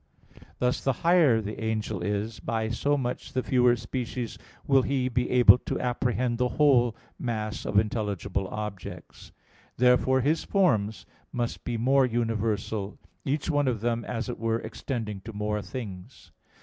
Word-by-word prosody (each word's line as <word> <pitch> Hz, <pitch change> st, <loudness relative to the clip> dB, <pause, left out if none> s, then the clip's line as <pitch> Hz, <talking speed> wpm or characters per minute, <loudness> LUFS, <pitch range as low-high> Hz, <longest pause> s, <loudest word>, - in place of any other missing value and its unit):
Thus 125 Hz, 0 st, 0 dB
the 135 Hz, -, +2 dB
higher 160 Hz, -10 st, +5 dB
the 110 Hz, +2 st, -6 dB
angel 110 Hz, -1 st, -2 dB
is, 105 Hz, +2 st, -2 dB
by 110 Hz, -1 st, -2 dB
so 145 Hz, +5 st, +1 dB
much 125 Hz, -2 st, -4 dB
the 130 Hz, -, 0 dB
fewer 125 Hz, -2 st, +4 dB
species 120 Hz, -1 st, -4 dB, 0.3 s
will 135 Hz, -1 st, +5 dB
he 130 Hz, -1 st, 0 dB
be 125 Hz, 0 st, 0 dB
able 125 Hz, 0 st, +7 dB
to -, -, -3 dB
apprehend 125 Hz, -1 st, 0 dB
the 125 Hz, -, +3 dB
whole 125 Hz, -6 st, +4 dB, 0.2 s
mass 110 Hz, -3 st, -3 dB
of 100 Hz, -, 0 dB
intelligible 100 Hz, -3 st, 0 dB
objects. 105 Hz, -2 st, -7 dB, 0.5 s
Therefore 125 Hz, +1 st, +4 dB
his 150 Hz, +5 st, +1 dB
forms 110 Hz, -, +1 dB, 0.3 s
must 120 Hz, -1 st, -3 dB
be 120 Hz, -1 st, -2 dB
more 130 Hz, +3 st, +4 dB
universal; 110 Hz, -3 st, -1 dB, 0.3 s
each 145 Hz, +4 st, 0 dB
one 145 Hz, -2 st, +2 dB
of 115 Hz, -5 st, 0 dB
them, 120 Hz, 0 st, 0 dB
as 115 Hz, -1 st, -3 dB
it 125 Hz, -, -5 dB
were, 115 Hz, 0 st, +1 dB
extending 110 Hz, -7 st, -5 dB
to 115 Hz, +2 st, -9 dB
more 105 Hz, 0 st, -2 dB
things. 100 Hz, -7 st, -8 dB
120 Hz, 150 wpm, -27 LUFS, 110-130 Hz, 0.5 s, able